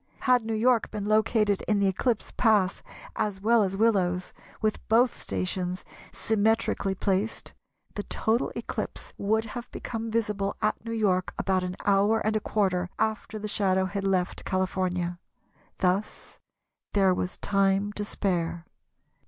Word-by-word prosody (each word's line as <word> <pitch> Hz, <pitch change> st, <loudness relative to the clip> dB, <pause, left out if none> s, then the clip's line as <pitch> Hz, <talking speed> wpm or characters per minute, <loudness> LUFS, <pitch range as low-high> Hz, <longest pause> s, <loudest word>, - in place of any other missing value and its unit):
Had 250 Hz, -3 st, +4 dB
New 225 Hz, 0 st, -2 dB
York 235 Hz, +1 st, +3 dB
been 210 Hz, -2 st, -4 dB
located 215 Hz, -1 st, +2 dB
in 210 Hz, -, +3 dB
the 200 Hz, -1 st, +3 dB
eclipse 220 Hz, +4 st, 0 dB
path 210 Hz, -5 st, +3 dB, 0.3 s
as 210 Hz, -3 st, -1 dB
well 225 Hz, +3 st, +4 dB
as 195 Hz, -1 st, 0 dB
Willows, 185 Hz, -5 st, +1 dB, 0.3 s
with 215 Hz, -1 st, 0 dB
both 235 Hz, +3 st, +3 dB
stations 180 Hz, 0 st, -2 dB, 0.3 s
symmetrically 220 Hz, -2 st, +1 dB
placed, 195 Hz, +3 st, -1 dB, 0.4 s
the 205 Hz, -, -3 dB
total 220 Hz, +3 st, 0 dB
eclipse -, -, -5 dB
would 220 Hz, +2 st, +1 dB
have 245 Hz, 0 st, -6 dB
become 225 Hz, -1 st, -5 dB
visible 210 Hz, -3 st, -1 dB
at 215 Hz, -, 0 dB
New 230 Hz, -, -5 dB
York 195 Hz, -5 st, 0 dB
about 190 Hz, -1 st, +1 dB
an 180 Hz, 0 st, -3 dB
hour 205 Hz, +2 st, +4 dB
and 215 Hz, 0 st, 0 dB
a -, -, +3 dB
quarter 185 Hz, -4 st, 0 dB
after 220 Hz, 0 st, -1 dB
the 210 Hz, 0 st, -4 dB
shadow 190 Hz, -2 st, +1 dB
had 195 Hz, +1 st, -3 dB
left 185 Hz, -2 st, 0 dB
California. 185 Hz, -2 st, -1 dB, 0.6 s
Thus 190 Hz, +3 st, -1 dB, 0.5 s
there 195 Hz, -2 st, +4 dB
was 180 Hz, 0 st, -3 dB
time 195 Hz, +1 st, +1 dB
to 210 Hz, -, -2 dB
spare. 170 Hz, -5 st, -2 dB
205 Hz, 145 wpm, -27 LUFS, 190-220 Hz, 0.6 s, Had